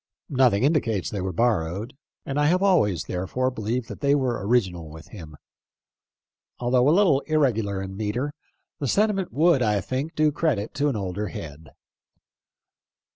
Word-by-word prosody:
Nothing 125 -6 +3
indicates 125 - +1
that 105 - -4
they - - -2
were 95 0 -2
borrowed, 100 0 -1 0.3
and 140 +1 -2
I 150 - +3
have 180 +4 +2
always, 130 - +3
therefore, 110 +9 -2
believed 115 0 -3
that - - -8
they 140 0 +3
were 125 -7 -1
original 95 -8 0
with 80 +1 -12
him. 80 -7 -11 1.2
Although 125 +2 +2
a 165 - +4
little 185 -10 +4
irregular 115 -11 +1
in 95 0 -7
metre, 115 +8 -2 0.5
the 140 - -2
sentiment 195 - +1
would, 160 -2 +3
I 105 -3 +2
think, 130 - -4
do 155 0 +3
credit 140 -9 -1
to 145 +1 +1
an 135 - -2
older 100 +1 -3
head. 80 -3 -8
120 Hz, 160 wpm, -24 LUFS, 100-145 Hz, 1.2 s, a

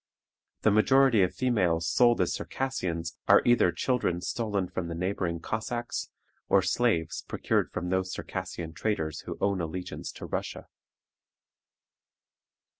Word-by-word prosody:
The 110 - +5
majority 130 +1 +5
of 90 -2 +3
females 90 -8 +1
sold 120 -4 +4
as 90 - +1
Circassians 85 -11 -3
are - - +7
either 120 -7 +4
children 90 -1 0
stolen 100 0 -2
from 90 -1 -4
the 85 - -4
neighboring 90 -1 -2
Cossacks, 120 +4 -3 0.4
or - - +5
slaves 85 -10 +1
procured - - 0
from 90 0 -3
those 95 0 0
Circassian 80 -3 -5
traders 80 -7 -2
who - - -4
own 100 -2 +1
allegiance 90 +3 -5
to - - -8
Russia. - - -4
95 Hz, 125 wpm, -28 LUFS, 85-115 Hz, 0.4 s, are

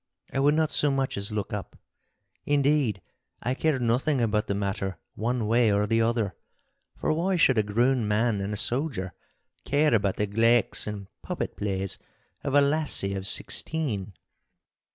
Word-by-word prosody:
I - - 0
would 145 +2 +4
not 155 -1 +1
so 150 - +3
much 135 -1 -1
as 100 +2 -2
look 105 -1 -3
up. 105 -2 -6 0.7
Indeed, 140 -7 +2 0.4
I 125 - 0
cared 140 -2 0
nothing 125 +5 +1
about 105 -2 +1
the 100 - -1
matter 100 -1 -2 0.2
one 120 +1 -1
way 115 0 +3
or 100 +1 +2
the 115 +2 +2
other, 115 -4 0 0.6
for - - 0
why 180 +4 0
should 135 -9 +4
a - - +5
grown 115 +3 +1
man 105 0 +1
and 100 +1 -3
a 105 - -2
soldier 120 - 0 0.5
care 150 0 +2
about 100 -3 +1
the 105 - +1
glaiks 115 +3 +2
and 105 -2 -5 0.2
puppet - - -4
plays 95 -2 -3 0.4
of 140 -1 -1
a 145 - +7
lassie 140 -9 0
of 95 0 -3
sixteen? 110 -12 -1
115 Hz, 165 wpm, -26 LUFS, 105-140 Hz, 0.7 s, a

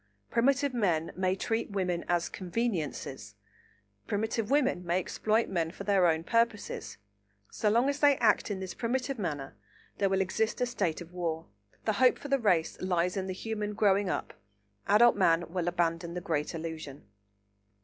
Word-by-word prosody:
Primitive 275 +3 +2
men 175 -9 +1
may 185 0 +1
treat 225 +4 -2
women 180 -4 -1
as 175 -1 +1
"conveniences"; 175 - -3 0.7
primitive 220 +1 -1
women 275 -9 +2
may 175 +1 0
exploit 215 +4 0
men 170 -4 -1
for 195 - -8
their 195 -3 +4
own 160 -1 +1
purposes; 230 +2 -1 0.5
so 210 - +1
long 235 +5 +3
as 285 0 -1
they 285 -2 +5
act 220 -2 +3
in 200 -2 -3
this 190 -1 -5
primitive 255 +2 -2
manner 145 -8 -3 0.5
there 195 - +3
will 190 0 +1
exist 215 +4 -1
a 250 - +2
state 195 -10 -2
of 175 +1 -11
war. 165 -3 -3 0.4
The 215 - +2
hope 255 - +6
for 285 - -8
the 275 0 +3
race 180 -8 +1
lies 180 -1 0
in 190 -1 -2
the 185 - -3
Human 210 +1 -4
growing 200 -2 +3
up. - - -3 0.5
Adult 230 +3 +6
man 170 -3 +4
will 180 -2 -1
abandon 170 0 -1
the - - -1
Great 150 -1 -2
Illusion. 160 -3 -6
190 Hz, 170 wpm, -30 LUFS, 170-225 Hz, 0.7 s, hope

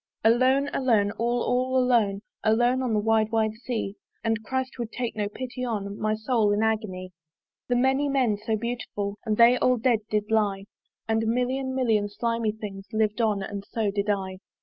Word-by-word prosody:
Alone, 255 +5 +4
alone, 220 -6 +2
all 240 +1 +1
all 255 +1 +1
alone 225 -6 +2 0.2
Alone 240 +4 +3
on 255 -3 -1
the 210 - +2
wide 220 0 +2
wide 220 -1 +1
Sea; 215 -5 -3 0.3
And 225 -1 0
Christ 260 +1 -3
would 235 -2 -4
take 240 -2 -3
no 205 -1 -1
pity 250 +3 -6
on 205 -4 -3
My 215 0 0
soul 220 -1 +1
in 210 +2 +1
agony. 210 -5 -2 0.6
The 245 - +1
many 265 +3 +2
men 255 -7 +2
so 220 - 0
beautiful, 210 -3 -4
And 215 -1 +1
they 235 +2 +7
all 255 0 +3
dead 235 -1 +2
did 210 +1 -1
lie! 205 -3 +1 0.4
And 220 0 +1
a 225 - -1
million 260 +3 0
million 220 -5 +1
slimy 230 +1 -1
things 205 -2 -8
Liv'd 215 +1 0
on 210 -3 +1
and 200 0 -5
so 215 -1 -2
did 200 +1 -2
I. 190 -2 -2
225 Hz, 185 wpm, -26 LUFS, 210-245 Hz, 0.6 s, they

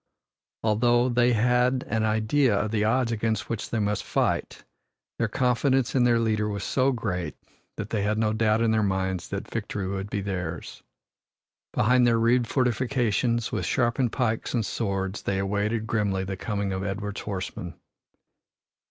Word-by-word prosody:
Although 120 +3 +3
they 120 0 +3
had 125 +3 +2
an 110 +1 0
idea 110 +3 +2
of 105 - -1
the 105 -2 +1
odds 115 +2 +2
against 110 0 -1
which 115 - -3
they 115 - -2
must 105 -2 0
fight, - - -1 0.5
their - - +2
confidence 130 0 +1
in 125 -2 +3
their 120 -1 +4
leader 110 -2 +1
was 100 -2 -4
so 130 +5 +2
great 90 - -3 0.4
that 105 0 -5
they 110 - 0
had 105 +2 0
no 110 -1 +1
doubt 110 0 +2
in 115 -1 +3
their 110 0 +2
minds 95 -2 -1
that - - -4
victory 100 -2 -4
would 95 +1 -4
be 105 - -2
theirs. 90 -4 -5 0.9
Behind 125 +2 +3
their 115 -1 +3
rude 120 +1 +3
fortifications, 120 -2 0
with - - -2
sharpened 120 0 +1
pikes 120 -1 -1
and 115 -3 +1
swords, 95 -2 -2
they 100 - -1
awaited 105 +3 -1
grimly 105 -4 0
the 95 0 -4
coming 100 0 -2
of 95 0 -3
Edward's 100 +1 -4
horsemen. 90 -4 -5
110 Hz, 160 wpm, -26 LUFS, 100-120 Hz, 0.9 s, their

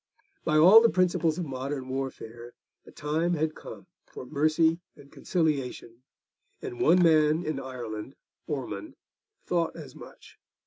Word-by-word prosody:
By 155 - +1
all 185 +8 +9
the 230 - +5
principles 175 -4 +1
of 180 - -3
modern 135 0 -5
warfare, 120 -3 -6 0.3
the - - -14
time 160 +4 -1
had 155 0 -1
come - - -11 0.2
for - - -10
mercy 155 +4 +2 0.2
and 140 - -17
conciliation, 135 -8 -2 0.6
and 370 -3 -7
one 180 - +5
man 155 0 +3
in 155 -3 -2
Ireland, 125 -2 -7 0.3
Ormond, 150 - -5 0.5
thought 170 -2 -1
as - - -10
much. - - -14
155 Hz, 135 wpm, -27 LUFS, 130-170 Hz, 0.6 s, all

